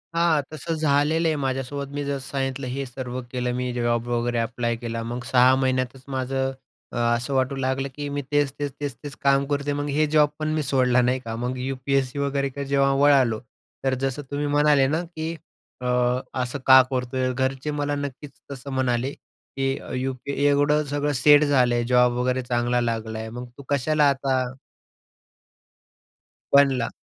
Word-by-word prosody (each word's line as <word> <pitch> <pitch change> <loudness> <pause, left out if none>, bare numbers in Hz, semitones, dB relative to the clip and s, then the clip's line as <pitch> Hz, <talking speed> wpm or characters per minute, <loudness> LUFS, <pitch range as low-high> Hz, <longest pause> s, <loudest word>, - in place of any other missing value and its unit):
हां, 165 -3 +3
तसं 160 +2 -4
झालेलं 155 +2 +2
आहे 155 - +1
माझ्यासोबत. 135 +1 -3
मी 145 0 -3
जसं 140 -1 -2
सांगितलं 135 -1 -2
हे 135 +2 -3
सर्व 125 0 -6
केलं, 125 -1 -1
मी 125 0 -2
जॉब 120 -1 0
वगैरे 120 0 0
अप्लाय 120 0 -1
केला. 115 0 -4
मग 120 +2 -5
6 130 +1 +5
महिन्यातच 130 0 -1
माझं 135 0 -1 0.4
अ, - - -9
असं 120 +2 0
वाटू 130 +1 +1
लागलं, 135 +1 -1
की 145 -1 -4
मी 145 - -1
तेच-तेच, 145 -1 0
तेच-तेच 145 -1 -6
काम 140 0 +3
करतोय, 145 0 0
मग 145 0 -2
हे 150 +2 +2
जॉब 150 -1 +4
पण 155 - -2
मी 155 -1 0
सोडला, 125 -2 +3
नाही 125 +1 +1
का? 115 -2 -6
मग 125 +2 -3
यू-पी-एस-सीकडे 135 +1 -1
वगैरे 140 0 -1
किंवा 140 +1 -6
जेव्हा 140 0 +3
वळालो, 135 -6 +4 0.4
तर 135 -1 +1
जसं 135 +2 -1
तुम्ही 145 +1 -1
म्हणाले 145 -1 +4
ना, 155 +4 0
की 165 -1 -5 0.5
अ, 125 - -5 0.6
असं 125 +3 -3
का 130 0 +10
करतोय? 130 0 -1
घरचे 135 +3 -1
मला 145 0 -1
नक्कीच 145 0 -6 0.2
तसं 140 0 -7
म्हणाले, 130 0 0
की 135 -1 -5 0.2
यूपी 130 +1 -4
एवढं 145 +1 +3
सगळं 145 0 0
सेट 150 0 +7
झालं, 125 -4 +3
जॉब 125 -1 +4
वगैरे 125 +1 0
चांगला 120 0 0
लागलाय 110 -1 -3
मग 125 +2 -8
तू 140 - -10
कशाला 145 +1 +3
आता 130 -2 0 2.0
बनला. 135 -4 +4
135 Hz, 165 wpm, -24 LUFS, 125-145 Hz, 2.0 s, का